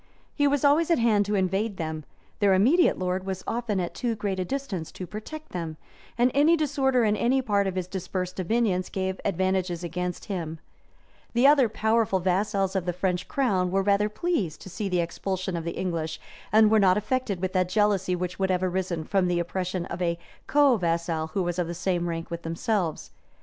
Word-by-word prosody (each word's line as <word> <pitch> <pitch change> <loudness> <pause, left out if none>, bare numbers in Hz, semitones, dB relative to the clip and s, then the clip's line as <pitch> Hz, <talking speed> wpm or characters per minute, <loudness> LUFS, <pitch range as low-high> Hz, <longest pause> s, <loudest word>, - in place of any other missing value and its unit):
He 290 -1 +2
was 285 0 +1
always 305 +4 +4
at 335 - +4
hand 215 -4 +3
to 210 - 0
invade 195 +2 0
them; 155 -2 -4 0.3
their 200 -3 +4
immediate 275 - +4
lord 185 0 -1
was 190 -1 -4
often 230 -4 -1
at 175 -1 -3
too 240 -3 -2
great 200 -3 -2
a - - +1
distance 200 - -4
to 185 - -6
protect 300 - -8
them; 165 -3 -5 0.4
and 245 +1 +3
any 305 +4 +5
disorder 270 -5 +2
in 210 -1 +3
any 250 +5 +2
part 205 -6 +1
of 190 - -3
his 185 -1 -1
dispersed 185 0 -4
dominions 190 -1 0
gave 190 0 -3
advantages 185 -2 0
against 180 +1 -4
him 165 -6 -4 0.8
The 240 +3 +3
other 280 -4 +6
powerful 220 -2 +1
vassals 195 +1 0
of 185 -2 -1
the 180 - 0
French 180 0 -1
crown 195 -10 +1
were 195 +1 +1
rather 205 +1 +2
pleased 210 - -2
to 190 - -10
see 205 +2 -3
the 180 -1 +1
expulsion 185 +2 -3
of 165 -1 -4
the 170 - -4
English, 165 -4 -2 0.3
and 215 0 +6
were 220 - +5
not 190 -1 +4
affected 210 -2 -1
with 185 0 -2
that 185 -1 +1
jealousy 195 -3 +2
which 180 +1 -4
would 190 0 +1
have 185 0 +1
arisen 180 -2 -1
from 190 +2 +1
the 175 -1 +1
oppression 180 +1 -2
of 175 0 -6
a 170 -1 0 0.3
co 285 -4 +4
vassal 170 -3 -1
who 195 - +1
was 175 0 -2
of 175 - 0
the 170 - -5
same 175 -1 -1
rank 165 0 -5
with 170 0 -4
themselves. 165 +1 -2
190 Hz, 200 wpm, -26 LUFS, 180-220 Hz, 0.8 s, other